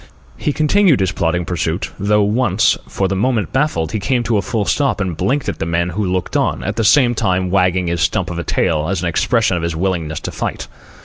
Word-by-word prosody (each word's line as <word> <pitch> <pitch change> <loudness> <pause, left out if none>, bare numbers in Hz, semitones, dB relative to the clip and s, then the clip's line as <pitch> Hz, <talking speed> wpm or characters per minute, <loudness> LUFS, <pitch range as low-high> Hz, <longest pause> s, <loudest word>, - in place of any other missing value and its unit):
He 150 - -1
continued 155 - +3
his 95 -2 +1
plodding 85 0 -1
pursuit, 85 0 -2
though 105 +1 +2
once, 110 -1 +2
for 95 - -1
the 95 - -2
moment 110 +1 0
baffled, 130 - 0
he 110 - -2
came 120 +4 0
to 115 -2 +1
a - - +1
full 110 0 -2
stop 140 +1 +1
and 95 -4 -2
blinked 135 - -1
at - - -3
the - - -2
men 85 +1 0
who 100 +4 -2
looked 90 -1 -2
on, - - 0
at - - -3
the 115 - 0
same 120 +2 +4
time 95 -5 0
wagging 90 -1 +2
his 85 -1 -1
stump 95 -2 0
of 85 - -4
a - - -3
tail 80 -2 0
as 95 -2 -1
an - - 0
expression 100 +2 +1
of - - -3
his 85 -1 -2
willingness 85 -3 -2
to - - -5
fight. - - -4
95 Hz, 235 wpm, -17 LUFS, 85-115 Hz, -, same